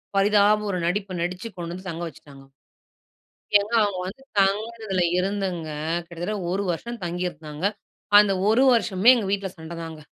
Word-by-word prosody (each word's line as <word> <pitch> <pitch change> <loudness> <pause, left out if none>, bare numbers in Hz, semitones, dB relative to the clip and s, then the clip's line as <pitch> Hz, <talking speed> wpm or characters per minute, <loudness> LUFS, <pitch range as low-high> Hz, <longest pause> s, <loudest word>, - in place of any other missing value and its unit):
பரிதாப 205 +1 +4
ஒரு 185 - -1
நடிப்பு 195 +1 -2
நடிச்சு, 180 +5 -3
கொண்டு 170 -1 -5
வந்து 185 +1 -8
தங்க 170 0 -5
வச்சுட்டாங்க. 140 -4 -13 1.2
ஏங்க 205 +3 -4
அவங்க 200 -3 -2
வந்து 220 +8 -8 0.2
தங்கினதில 205 0 0 0.2
இருந்துங்க 185 -4 -2 0.4
கிட்டத்தட்ட 175 +5 -4 0.2
ஒரு 195 +2 0
வருஷம் 235 +7 -6
தங்கியிருந்தாங்க. 170 -2 -4 0.5
அந்த 210 -1 +3 0.2
ஒரு 235 +4 +4
வருஷமுமே 225 -2 +4
எங்க 220 -4 -2
வீட்ல 200 -1 -1
சண்டைதாங்க. 165 -1 -7
190 Hz, 135 wpm, -24 LUFS, 170-205 Hz, 1.2 s, பரிதாப